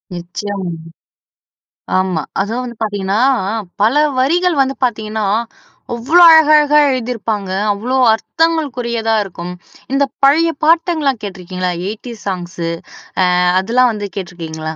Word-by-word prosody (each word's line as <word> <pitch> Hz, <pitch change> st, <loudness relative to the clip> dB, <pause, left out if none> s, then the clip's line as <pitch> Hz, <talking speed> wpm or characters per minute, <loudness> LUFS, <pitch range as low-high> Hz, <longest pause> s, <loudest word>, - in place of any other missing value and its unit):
நிச்சயமாங்க. 180 Hz, +1 st, -5 dB, 1.3 s
ஆமா. 185 Hz, -4 st, -1 dB, 0.2 s
அதுவும் 225 Hz, +5 st, -3 dB
வந்து 240 Hz, -1 st, -7 dB
பார்த்தீங்கன்னா, 205 Hz, -1 st, -1 dB, 0.3 s
அ -, -, -3 dB, 0.3 s
பல 220 Hz, +6 st, +3 dB, 0.2 s
வரிகள் 345 Hz, +6 st, +2 dB
வந்து 270 Hz, 0 st, 0 dB
பார்த்தீங்கன்னா, 220 Hz, -3 st, -1 dB, 0.7 s
அவ்ளோ 275 Hz, +10 st, +3 dB
அழகழகா 300 Hz, -2 st, +6 dB
எழுதிருப்பாங்க. 225 Hz, -6 st, -3 dB, 0.2 s
அவ்ளோ 240 Hz, +6 st, -2 dB, 0.2 s
அர்த்தங்களுக்குரியதா 245 Hz, -5 st, -1 dB
இருக்கும். 180 Hz, -2 st, -7 dB, 0.4 s
இந்த 275 Hz, +1 st, +3 dB, 0.2 s
பழைய 325 Hz, +4 st, +4 dB
பாட்டுங்கள்லாம் 315 Hz, -6 st, +2 dB
கேட்டுருக்கீங்களா? 185 Hz, -2 st, -4 dB, 0.2 s
Eighties 225 Hz, +1 st, -9 dB
songs. 180 Hz, -2 st, -5 dB, 0.6 s
அ -, -, +3 dB, 0.3 s
அதெல்லாம் 245 Hz, +5 st, +2 dB
வந்து 205 Hz, -1 st, -4 dB
கேட்டுருக்கீங்களா? 160 Hz, -4 st, -6 dB
225 Hz, 105 wpm, -16 LUFS, 190-275 Hz, 1.3 s, அழகழகா